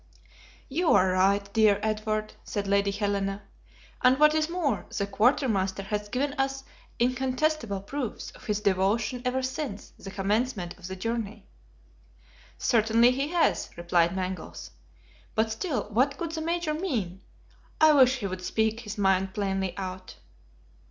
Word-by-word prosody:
"You 325 +5 +2
are 185 -2 +4
right, 195 +2 +2
dear 215 -2 +4
Edward," 215 0 -1
said 205 -1 -3
Lady 200 0 +2
Helena! 200 -1 -1 0.6
"and 255 +1 +5
what 300 0 +6
is 310 0 +1
more, 325 - -1
the 200 - +1
quartermaster 200 -3 +1
has 205 +1 -3
given 275 +5 -1
us 270 0 -1 0.3
incontestable 255 -2 0
proofs 250 +3 -5
of - - -16
his 210 -1 -1
devotion 210 +5 +1
ever 260 +1 0
since 260 -5 -4
the 195 - -8
commencement 200 0 -1
of 180 - -8
the 190 - -5
journey." 220 0 -4 1.1
"Certainly 230 +1 +4
he 275 +3 -1
has," 340 +1 +1
replied 170 0 +2
Mangles; 185 0 -5 0.6
"but 220 0 +1
still, 250 - -2
what 265 +6 +2
could 335 -2 -4
the 320 -1 -4
Major 335 -1 -1
mean? 230 - -3 0.6
I 315 -1 +7
wish 260 -2 +6
he 220 - -5
would 185 -1 -4
speak 220 +3 0
his 220 -2 -7
mind 190 -1 +2
plainly 195 -3 -1
out." 185 -1 -6
215 Hz, 145 wpm, -27 LUFS, 195-260 Hz, 1.1 s, I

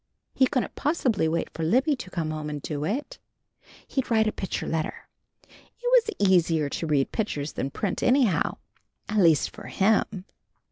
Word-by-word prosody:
He 260 - +4
couldn't 255 -1 -1
possibly 255 - +1
wait 165 +1 -1
for - - -6
Libby 260 - +2
to 235 - -8
come 165 -4 -3
home 155 -1 -4
and 150 -1 -4
do 145 0 -4
it. 285 - -3 0.7
He'd 265 -2 -2
write 220 -2 +3
a 215 - +1
picture 190 - -4
letter. 160 -1 -3 0.4
It - - -25 0.4
was 200 - +3
easier 165 -5 +3
to 165 - -3
read 145 -3 +1
pictures 155 -10 -2
than 135 - -2
print, 195 +7 -3
anyhow. 245 - +2 0.5
At 215 - -2
least 165 -6 +4
for - - -11
him. 195 -2 +1
185 Hz, 170 wpm, -26 LUFS, 155-235 Hz, 0.7 s, He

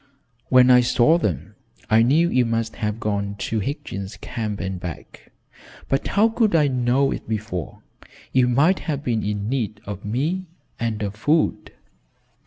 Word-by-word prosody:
"When 130 0 +6
I 125 0 +7
saw 125 +7 +3
them, 90 - -3 0.3
I 110 +1 +4
knew 150 +9 +4
you 125 - +3
must 115 -1 -2
have 105 -1 -2
gone 100 -2 -2
to 110 +2 -2
Higgins' 105 -4 -5
Camp 110 -4 -4
and 95 -1 -4
back, 85 -3 -9 0.6
but 135 - 0
how 210 +3 +3
could 225 -4 +1
I 150 -3 +4
know 130 +1 +1
it - - -6
before? 105 -6 -4 0.5
You 130 -1 +4
might 150 +10 +3
have 145 -2 -2
been 115 -5 0
in 105 0 -2
need 115 -4 -2
of 100 -1 -6
me, 155 - -2 0.3
and 110 -2 -2
of 100 -1 -3
food." 150 +9 0
115 Hz, 160 wpm, -22 LUFS, 105-140 Hz, 0.6 s, I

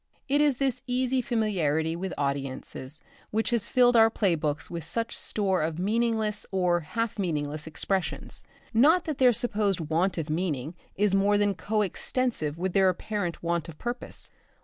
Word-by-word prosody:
It 285 +2 +3
is 290 -4 +3
this 260 -2 0
easy 255 +1 +1
familiarity 170 - 0
with 185 +2 -4
audiences 140 0 -3 0.3
which 220 +3 0
has 235 -3 +1
filled 245 -1 +4
our 225 -1 +7
play 200 -5 +1
books 150 -2 -2
with 170 -1 -5
such 230 +9 -2
store 190 -4 0
of 155 0 -1
meaningless 220 +2 0
or 180 -3 +2
half 225 +7 -3
meaningless 150 -4 -2
expressions. 190 +4 -2 0.3
Not 310 +10 +5
that 310 -5 -3
their 255 -2 +7
supposed 215 -5 0
want 165 +4 0
of 160 -2 -2
meaning 155 -3 -2 0.2
is 205 0 +2
more 200 +1 +4
than 205 -1 +2
co 215 +2 0
extensive 195 - -1
with 180 +1 -2
their 195 -1 +5
apparent 180 -1 -3
want 170 0 -1
of 155 - -10
purpose. 240 +1 -4
195 Hz, 165 wpm, -27 LUFS, 165-230 Hz, 0.3 s, our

